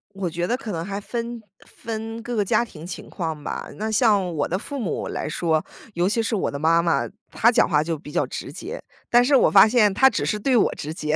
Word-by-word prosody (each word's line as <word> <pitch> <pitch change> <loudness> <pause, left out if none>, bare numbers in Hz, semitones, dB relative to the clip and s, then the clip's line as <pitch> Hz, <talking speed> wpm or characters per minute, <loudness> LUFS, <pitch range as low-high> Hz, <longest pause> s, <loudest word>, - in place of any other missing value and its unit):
我 190 -3 -2
觉 175 +2 -2
得 245 - +1
可 235 -5 -6
能 165 -1 -3
还 200 +1 -4
分 235 +1 -5 0.2
分 225 0 -6
各 240 -1 -4
个 205 - +2
家 235 - +2
庭 170 -7 -10
情 180 - -8
况 160 -4 -4
吧。 - - -5
那 220 +1 -3
像 205 -6 +2
我 145 -2 -1
的 185 - -1
父 280 +6 -6
母 210 - -3
来 - - -3
说， 160 0 0 0.3
尤 175 +2 +1
其 225 +2 +1
是 225 - -2
我 - - -1
的 140 - -5
妈 165 +3 +3
妈， 170 -1 +1 0.3
她 235 - +4
讲 - - +3
话 150 -1 +3
就 165 -2 -3
比 150 - -11
较 - - +1
直 125 - -6
接。 370 - -7 0.3
但 240 0 +5
是 275 +1 +4
我 - - +5
发 200 +2 +8
现 215 -4 +4
她 265 +6 +6
只 - - -2
是 210 - -1
对 255 +4 +1
我 225 - +3
直 155 +2 -5
接， 155 -2 -1
200 Hz, 270 characters per minute, -23 LUFS, 165-230 Hz, 0.3 s, 发